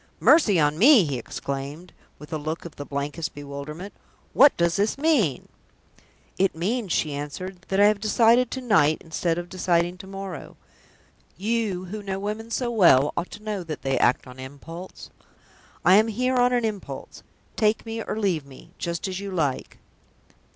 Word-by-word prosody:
"Mercy 220 - +5
on 150 +1 +2
me!" 250 -1 +7
he 140 -4 -2
exclaimed, 140 +8 -6 0.2
with 150 +2 -11
a 155 - -1
look 155 +3 -4
of 170 - -9
the 145 - -8
blankest 145 +4 -4
bewilderment. 145 +6 -7 0.4
"What 285 - +6
does 170 -1 +2
this 205 +5 0
mean?" 275 - +1 0.9
"It 195 -2 +2
means," 200 +4 -2
she 155 -2 0
answered, 175 +6 -6
"that 195 - 0
I 205 - +7
have 210 0 +3
decided 230 +3 +4
to 260 - -5
night 160 - +3
instead 165 +1 -1
of 175 0 -4
deciding 175 -1 0
to 190 - -10
morrow. 195 -3 -8 0.8
You, 205 -2 -1
who 210 +4 -6
know 195 -1 -4
women 215 +3 -4
so 240 +1 -1
well, 170 - +5
ought 175 - -3
to 210 - -11
know 210 -3 -3
that 160 -3 -7
they 135 -1 0
act 125 - +2
on 125 0 -12
impulse. 155 +7 -10 0.7
I 185 +2 +7
am 220 +2 +4
here 250 +4 0
on 245 0 +4
an 245 -2 +1
impulse. 210 -3 -6 0.3
Take 215 +1 +1
me 225 0 -4
or 210 - -4
leave 190 -8 0
me, 140 +4 -15
just 170 +2 -3
as 185 0 -4
you 200 0 -5
like." 155 -8 -2
185 Hz, 175 wpm, -25 LUFS, 155-215 Hz, 0.9 s, me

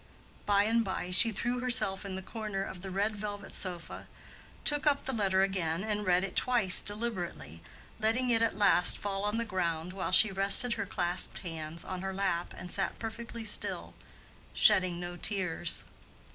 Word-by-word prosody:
By 200 -1 +3
and 230 +2 +1
by 190 -2 -5
she 225 +5 +8
threw 240 +4 -2
herself 240 -6 +1
in 195 -2 -6
the 190 - -7
corner 210 -2 -5
of 190 -2 -8
the 195 - -7
red 200 +3 -1
velvet 205 -1 -7
sofa, 175 -3 -4 0.6
took 295 0 +3
up 285 -1 +1
the 265 - -3
letter 195 -4 +1
again 185 -3 -2
and 210 -2 -3
read 180 0 +2
it 195 - -6
twice 235 -7 +3
deliberately, 200 - -5 0.4
letting 235 +3 0
it 230 -1 +2
at 230 -3 0
last 180 -4 +4
fall 195 -1 -4
on 210 +2 -1
the 230 - -2
ground, 175 -4 -3
while 190 - -4
she 215 - +6
rested 195 +6 +5
her - - -4
clasped 175 +3 0
hands 165 -1 -6
on 185 -1 -6
her 190 0 -5
lap 190 -3 -2
and 180 - -9
sat 195 -1 -1
perfectly 230 0 -7
still, 210 - -1 0.6
shedding 180 -2 +4
no 175 0 -7
tears. 180 -4 0
195 Hz, 175 wpm, -30 LUFS, 180-220 Hz, 0.6 s, she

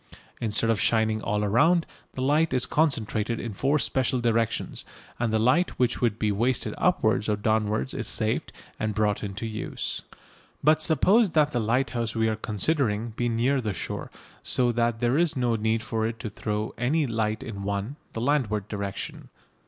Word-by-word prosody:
Instead 115 0 +1
of 110 - 0
shining 110 -1 +2
all 105 0 0
round, 165 - +4 0.3
the 130 - -2
light 150 +2 +2
is 125 - +2
concentrated 115 -7 0
in 115 - -5
four 135 +9 +1
special 130 -2 0
directions, 115 -1 0 0.4
and 120 -2 0
the 110 - +2
light 130 +11 +2
which 125 -1 +1
would 115 -3 +1
be 105 -2 +1
wasted 120 +5 0
upwards 105 - +2
or 105 - +2
downwards 105 -7 0
is - - -4
saved - - -1 0.3
and 110 -1 -1
brought 105 -2 +1
into 100 +2 -4
use. 110 -1 -4 0.6
But 155 +2 +4
suppose 190 - +4
that 150 -1 +4
the 120 - 0
lighthouse 120 0 0
we 110 0 +2
are 110 - 0
considering 110 - 0
be 120 +2 -1
near 125 +4 +1
the 105 -4 -3
shore, 80 - -4 0.3
so 125 -1 +1
that 120 -1 0
there 120 +5 +2
is 170 -5 +1
no 120 -2 +1
need 110 +1 0
for 110 0 -1
it 115 0 -5
to 110 - -5
throw 105 +1 -3
any 145 +6 +2
light 110 -3 -1
in 100 -4 -6
one 100 +6 -3 0.2
the 115 - -4
landward 115 -7 0
direction. 100 -2 -5
115 Hz, 175 wpm, -26 LUFS, 110-130 Hz, 0.6 s, round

